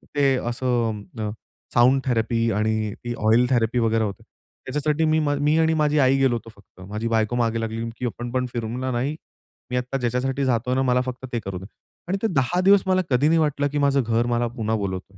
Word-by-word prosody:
ते 140 -2 +3
असं 120 -3 -1 0.2
अ, 105 -1 -2 0.4
sound 125 +3 +4
therapy 115 -2 +1
आणि 110 0 0
ती 120 0 -3
ऑइल 115 +3 +5
थेरपी 120 -1 +1
वगैरे 115 -1 +2
होते. 100 -3 -4 0.4
त्याच्यासाठी 150 +3 0
मी 155 0 +3
मी 145 0 +1
आणि 160 0 +3
माझी 150 0 +2
आई 135 0 +4
गेलो 135 -3 +3
होतो 115 -1 -7
फक्त. 100 -2 -20
माझी 105 +2 -3
बायको 115 0 +1
मागे 115 -1 0
लागली 115 +1 -3
की 125 - -4
"आपण 120 0 -4
पण 125 0 0
फिरू 115 -2 -3
ना," 110 - -5
म्हणल, 130 0 -2
"नाही." 130 +5 -1 0.6
मी 125 - 0
आत्ता 125 +2 -2
ज्याच्यासाठी 130 +2 -1
जातोय 125 0 0
ना 130 - +2
मला 125 -1 +2
फक्त 130 0 -6
ते 120 - 0
करू 95 -1 -4
दे 95 - -10 0.4
आणि 190 +3 0
ते 225 - +2
10 165 +6 +1
दिवस 195 +1 +6
मला 185 0 +3
कधी 135 +2 +3
नाही 165 +1 +4
वाटलं 145 -2 +1
की 150 - -2
माझं 140 -1 +3
घर 115 +1 +1
मला 120 0 +1
पुन्हा 110 -1 0
बोलवतोय 100 -1 -5
125 Hz, 220 wpm, -23 LUFS, 115-140 Hz, 0.6 s, दिवस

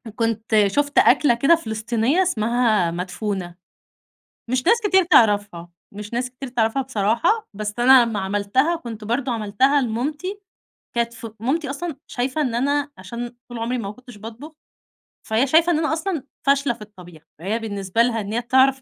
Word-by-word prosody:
كنت 225 -1 -1
شُفت 285 +8 -1
أكْلة 245 +2 +5
كده 275 +8 +4
فلسطينية 235 - 0
اسمها 225 - +1
مدفونة. 180 +1 -4 0.9
مش 255 0 0
ناس 465 - +6
كتير 380 -2 +4
تعرَفها، 205 - +3 0.2
مش 205 +2 -8
ناس 250 +1 -1
كتير 255 +1 -8
تعرَفها 235 +2 0
بصراحة، 260 - 0
بس 210 +1 -4
أنا 255 0 +7
لمّا 225 -3 -3
عملتها 205 - 0
كنت 230 -9 -8
برضه 245 +4 -1
عملتها 240 +6 +2
لمامتي، 295 - -3 0.6
كانت 235 0 -1
ف 230 -1 -9
مامتي 275 +5 -1
أصلًا 310 +2 -5
شايفة 255 +4 -2
إن 255 -6 0
أنا 285 +4 0
عشان 240 0 -7
طول 240 -1 -7
عمري 235 +2 -2
ما 200 -4 -4
كنتش 250 0 -15
باطبُخ، 230 +8 -10 0.8
فهي 225 +5 +2
شايفة 325 +5 +4
إن 330 - +2
أنا 315 0 0
أصلًا 325 -3 -2 0.2
فاشلة 275 -2 +2
في 235 - -18
الطبيخ. 180 -6 -13 0.2
فهي 205 +7 -2
بالنسبة 200 -1 -1
لها 235 -1 +1
إن 205 +1 -6
هي 235 - 0
تعرَف 260 +2 +3
240 Hz, 165 wpm, -22 LUFS, 215-275 Hz, 0.9 s, أنا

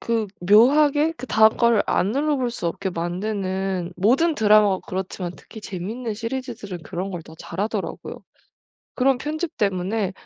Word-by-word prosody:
그 225 -2 -1
묘하게 290 - +5
그다음 220 -7 +3
거를 235 -3 +4
안 195 - +1
눌러볼 275 -1 0
수 205 -7 -4
없게 190 +3 -2
만드는 185 0 -3
모든 270 - +3
드라마가 210 -4 +4
그렇지만 185 -1 -4
특히 220 - -12
재밌는 210 +5 -5
시리즈들은 230 -6 -5
그런 185 +6 -5
걸 175 -3 -6
더 160 - -14
잘하더라고요. 205 +3 -4 0.8
그런 265 0 +2
편집 310 +3 -4
때문에 195 0 -1
215 Hz, 330 characters per minute, -23 LUFS, 185-250 Hz, 0.8 s, 묘하게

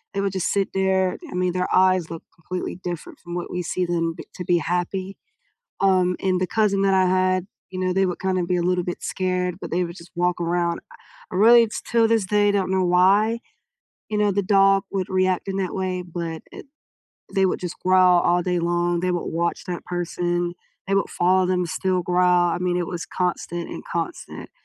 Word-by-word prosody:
They 200 - 0
would 195 -1 -1
just 190 -2 -1
sit 200 -1 0
there 190 -1 +1
I - - -6
mean, 180 -1 0
their 180 0 -1
eyes 185 -3 +3
look 165 -1 -7
completely 180 +2 -6
different 175 -2 -6
from 175 0 -8
what 175 - -4
we 180 - -2
see 180 +1 -2
them 165 -1 -1
b - - -8
to 180 - -5
be 175 -1 +3
happy, 180 +3 -2 0.6
um, 185 -2 +3
and 185 -1 +1
the 185 - +1
cousin 205 -2 +1
that 195 -1 +3
I 190 0 +4
had, 185 0 +1 0.2
you 185 - -6
know, 185 0 0
they 190 0 +2
would 180 - -3
kinda 185 -1 0
be 180 +1 0
a 175 - 0
little 180 0 +1
bit 175 - -5
scared, 180 -1 -2
but - - -7
they 180 +1 +1
would 170 +1 -7
just 170 +1 -13
walk 180 0 0
around. 170 0 0 0.5
Really, 230 +5 +6
it's 220 - -5
till 230 -1 +2
this 225 -3 +2
day, 205 0 +3
I - - +4
don't 190 -2 0
know 190 -1 +2
why, 200 +6 +3 0.7
you 210 - -1
know, 205 -1 +2
the 200 +1 0
dog 195 0 +4
would 190 -2 -2
react 185 0 0
in 195 - -2
that 185 -2 -2
way, 185 -1 -2
but 170 -2 -5
it, - - -10 0.7
they 195 -1 +3
would - - 0
just 180 -1 -5
growl 185 -1 +5
all 175 0 +2
day 180 -1 0
long, 175 0 0
they 180 +1 0
would 175 - -2
watch 170 +1 -2
that 175 -1 -5
person, 175 0 -2 0.3
they 195 - 0
would 195 - +1
follow 185 +1 +2
them, 180 -1 +1
still 185 +2 -1
growl, 180 0 +3
I - - -2
mean, 180 -1 0
it 175 - -1
was 175 -2 -5
constant 175 -1 -3
and - - -7
constant 170 - -5
180 Hz, 215 wpm, -23 LUFS, 175-190 Hz, 0.7 s, Really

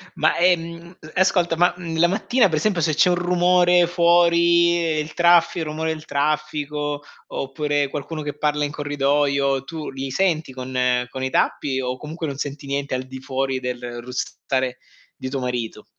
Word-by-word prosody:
Ma, 155 +1 +2
ehm, 170 0 0
e 155 +4 -3
ascolta, 175 -3 +2
ma, 175 +2 +3
mhmm, 165 -2 -5
la 175 - +6
mattina 220 +5 +2
per 155 - 0
esempio 180 0 +1
se 155 0 +1
c'è 180 +3 +4
un 175 - +3
rumore 175 0 +3
fuori, 170 0 +4 0.2
il 155 +1 -4
traffi 175 0 +4
il 160 - -2
rumore 160 +1 -2
del 155 0 -10
traffico 150 0 -2 0.3
oppure 145 +1 -1
qualcuno 155 +3 -5
che 145 0 -5
parla 150 0 0
in 145 - -4
corridoio, 140 -2 0
tu 155 +2 -6
li 135 0 -5
senti 165 -5 0
con 130 0 -6 0.3
con 130 +1 -6
i 130 - 0
tappi 135 0 0
o 125 0 -3
comunque 155 +3 -6
non 140 - -4
senti 140 0 -5
niente 140 0 -2
al 130 - -1
di 130 0 -9
fuori 130 0 -2
del 125 -1 -5
russare 130 +1 -3 0.4
di 130 - -6
tuo 135 0 -3
marito? 125 -3 -4
150 Hz, 175 wpm, -22 LUFS, 135-170 Hz, 0.4 s, la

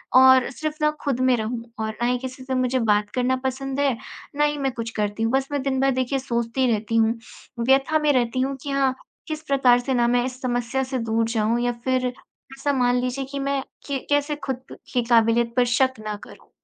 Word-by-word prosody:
और 260 -1 +7
सिर्फ़ 310 +3 -4
ना 300 0 +4
ख़ुद 275 -4 -1
में 255 -1 +4
रहूँ, 230 +2 -3 0.2
और 220 - -1
ना 240 - +2
ही 250 0 +2
किसी 260 0 -7
से 260 - -4
मुझे 255 0 +1
बात 210 -2 +2
करना 255 +1 +2
पसंद 270 +1 -2
है, 270 -5 +2 0.4
ना 295 - +2
ही 295 0 0
मैं 270 -2 0
कुछ 230 -2 -4
करती 210 +1 -1
हूँ, 225 - +1
बस 270 0 +1
मैं 285 - 0
दिन 265 -1 0
भर 270 0 +3
देखिए 260 +1 0
सोचती 245 0 -1
रहती 220 +1 -1
हूँ, 225 0 +4 0.5
व्यथा 270 +6 +3
में 300 -1 +3
रहती 245 -1 +1
हूँ 270 +1 -1
कि 285 - -5
हाँ, 275 -1 +2 0.3
किस 310 -1 -4
प्रकार 255 -3 +4
से 260 +2 -2
ना 240 -1 +3
मैं 245 0 +2
इस 255 0 -6
समस्या 245 +1 -1
से 260 -1 -3
दूर 225 0 0
जाऊँ 225 +1 +1
या 245 - +1
फिर 255 -1 +1
ऐसा 270 +3 -5
मान 245 -2 +2
लीजिए 255 +2 -2
कि 280 - -3
मैं 275 0 0 0.3
कि 275 -2 -1
कैसे 290 +1 +2
ख़ुद 260 -1 -5 0.2
की 245 - +2
काबिलियत 230 0 +3
पर 250 - +5
शक 260 -3 +2
ना 210 - -2
करूँ। - - -15
255 Hz, 225 wpm, -23 LUFS, 235-270 Hz, 0.5 s, और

